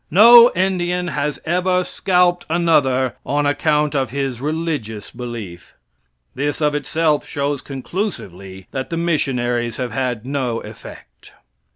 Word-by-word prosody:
No 235 +6 +8
Indian 180 -1 0
has 150 -1 -2
ever 180 +2 +1
scalped 180 -1 +1
another 145 -7 +2
on 145 +1 0
account 150 +1 +1
of 135 -4 0
his 135 -2 -3
religious 150 -8 -3
belief. 115 -8 -8 0.6
This 145 +3 -2
of 150 -1 +1
itself 150 +1 0
shows 140 -1 -2
conclusively 100 - -6
that 130 -1 -4
the 165 - -3
missionaries 125 -8 -1
have 125 -2 -3
had 125 -4 -2
no 130 -4 -2
effect. - - -13
145 Hz, 120 wpm, -19 LUFS, 125-170 Hz, 0.6 s, No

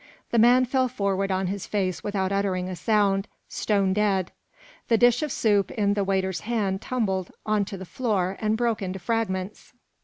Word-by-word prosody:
The 235 - +3
man 245 +3 +6
fell 260 +1 +1
forward 200 -5 -1
on 190 0 0
his 195 +1 -4
face 185 -4 -1
without 195 -2 -1
uttering 195 -2 0
a 185 - -4
sound, 200 0 +1 0.2
stone 200 -3 0
dead; 195 -3 +1 0.6
the 230 - +4
dish 245 +2 +4
of 305 -2 -2
soup 205 -5 +2
in 205 -2 +1
the 205 -1 0
waiter's 190 -1 0
hand 210 -4 -1
tumbled 195 -8 -1 0.2
onto 210 -1 0
the 190 - -8
floor 195 -4 -1
and 215 0 +1
broke 235 -2 0
into 190 0 -3
fragments. 195 -1 -3
200 Hz, 175 wpm, -25 LUFS, 190-225 Hz, 0.6 s, man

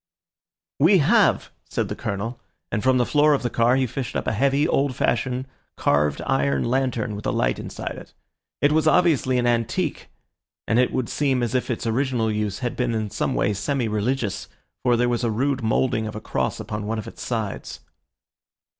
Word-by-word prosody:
"We 170 +8 +6
have," 200 +7 +3 0.2
said - - -1
the - - -4
Colonel, 110 +5 -4 0.3
and 105 - 0
from 130 +2 +3
the 125 - +2
floor 150 +2 +4
of 135 - -4
the 120 - -1
car 120 +2 +3
he 135 0 +2
fished 125 +1 -5
up - - -1
a - - 0
heavy, 140 +6 +2
old 140 -5 +1
fashioned, 125 +2 0 0.3
carved 75 0 +1
iron 70 0 +1
lantern 125 -4 -1
with 105 - -5
a - - +1
light - - 0
inside - - -6
it. - - -15 0.5
It 145 - +5
was 155 +1 +2
obviously 150 -8 +3
an 120 - +1
antique, 120 +8 -1 0.6
and 115 - +3
it 125 - +3
would 130 -3 -1
seem 135 -4 0
as 120 - -2
if 130 0 0
its 120 -1 -2
original 120 -1 0
use 105 -2 -2
had 120 - -2
been 125 -2 0
in 110 -2 -2
some 105 - -1
way 105 - +1
semi 115 +5 -1
religious, 105 -1 -1 0.3
for 120 -2 +3
there 120 +1 +2
was 120 0 0
a 120 - +1
rude 130 +5 0
moulding 110 0 +1
of 110 - -6
a - - -4
cross - - -2
upon 105 -1 -5
one 110 +1 -1
of 110 - -5
its - - -10
sides. 110 -5 -4
120 Hz, 200 wpm, -23 LUFS, 110-135 Hz, 0.6 s, We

